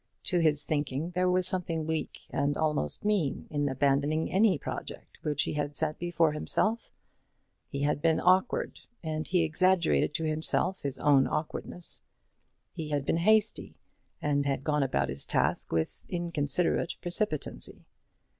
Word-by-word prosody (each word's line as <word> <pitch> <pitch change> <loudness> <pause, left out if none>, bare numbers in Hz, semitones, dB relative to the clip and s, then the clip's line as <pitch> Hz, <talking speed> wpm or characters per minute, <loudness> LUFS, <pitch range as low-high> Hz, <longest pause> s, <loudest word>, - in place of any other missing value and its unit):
To 180 - +1
his 150 -3 +3
thinking 150 +2 -1
there 180 +1 +1
was 180 0 +2
something 165 -4 -2
weak 160 0 -3
and 140 +1 0
almost 150 - 0
mean 200 -10 0
in 145 -1 0
abandoning 140 +4 +1
any 195 -2 +4
project - - -7
which 150 -1 0
he - - -3
had 145 -1 -2
set 155 +1 0
before 170 -2 +2
himself. 215 +9 -1 0.8
He 140 - -4
had 145 0 +1
been 160 0 +3
awkward, 185 +6 +2 0.2
and 155 -1 -3
he 180 -2 +2
exaggerated 170 -1 +2
to 160 - -1
himself 155 +4 0
his 140 -2 -1
own 140 -2 +4
awkwardness. 165 +2 -4 0.7
He 155 -2 -5
had 145 -2 -1
been 165 - +1
hasty, 215 +5 +2 0.5
and 145 -1 +1
had 135 -1 -1
gone 150 0 +1
about 95 - 0
his 70 - -4
task - - 0
with 80 -1 -1
inconsiderate 170 -1 0
precipitancy. 175 - -3
155 Hz, 145 wpm, -29 LUFS, 145-175 Hz, 0.8 s, any